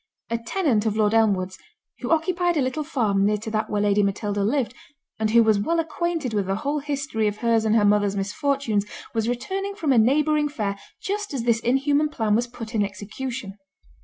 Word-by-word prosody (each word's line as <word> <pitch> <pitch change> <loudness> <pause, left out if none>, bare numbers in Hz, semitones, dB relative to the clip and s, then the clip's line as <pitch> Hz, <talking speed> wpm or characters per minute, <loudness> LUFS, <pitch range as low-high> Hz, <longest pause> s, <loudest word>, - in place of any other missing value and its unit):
A 230 - 0
tenant 230 - 0
of 215 0 -1
Lord 215 -1 +3
Elmwood's, 195 -5 +2 0.4
who - - -4
occupied 345 +1 +1
a - - +3
little 260 +4 -2
farm 220 -10 +1
near 210 +1 +2
to 220 +1 -6
that 215 0 -1
where 205 -1 0
Lady 205 0 +3
Matilda 205 0 -1
lived, 245 +3 0 0.5
and 220 -1 +1
who 230 +1 +6
was 220 -2 +3
well 330 +11 0
acquainted 325 -5 -2
with 200 -3 0
the 195 - 0
whole 285 +8 -1
history 275 -6 -2
of 205 0 -2
her's 230 -1 +2
and 220 0 +3
her 210 -2 +4
mother's 205 -1 +3
misfortunes, 215 +2 0 0.3
was 225 0 0
returning 390 +11 -3
from 320 -8 0
a 250 - +5
neighbouring 295 +5 +3
fair, 200 -7 -3 0.2
just 410 -5 -3
as 245 - -2
this 230 -1 +2
inhuman 285 +5 +2
plan 220 -7 0
was 240 +3 +2
put 235 -1 -9
in 215 -2 +2
execution. 205 +2 -6
230 Hz, 200 wpm, -24 LUFS, 210-290 Hz, 0.5 s, who